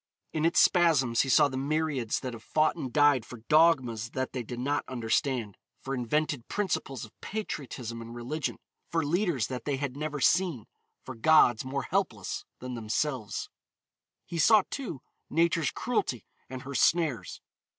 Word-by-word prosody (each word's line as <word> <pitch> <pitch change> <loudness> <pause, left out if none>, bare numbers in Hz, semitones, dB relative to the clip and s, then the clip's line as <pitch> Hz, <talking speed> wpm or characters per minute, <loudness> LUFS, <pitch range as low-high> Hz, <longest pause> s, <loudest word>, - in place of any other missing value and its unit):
In 155 0 0
its 170 - +4
spasms 145 -10 +4
he 135 - -2
saw 150 +2 +6
the 135 -2 -5
myriads 140 -4 -1
that 130 -2 -4
have 115 - -9
fought 155 +6 +1
and 135 -7 -5
died 145 -4 +4
for 115 0 -11
dogmas 130 -8 +3
that 130 -1 -2
they 125 - -2
did 120 +1 -7
not 140 +4 0
understand, 120 -2 -1 0.2
for 135 - -5
invented 140 +2 -1
principles 140 - -2
of 110 - -16
patriotism 130 - -5
and 115 +1 -9
religion, 135 +6 -3 0.3
for 165 -2 0
leaders 170 - +1
that 125 -2 -6
they 145 - 0
had 135 -2 -3
never 150 0 -3
seen, 165 - +2 0.4
for 130 - -6
gods 120 -2 +5
more 135 +1 -3
helpless - - -2
than 125 0 -6
themselves. 115 +1 -2 0.8
He 170 - -5
saw, 210 +6 +6
too, 175 - -5 0.3
Nature's 165 -2 +2
cruelty 220 - -2 0.2
and 130 0 -7
her 140 0 -7
snares. 140 - +1
135 Hz, 160 wpm, -29 LUFS, 120-155 Hz, 0.8 s, saw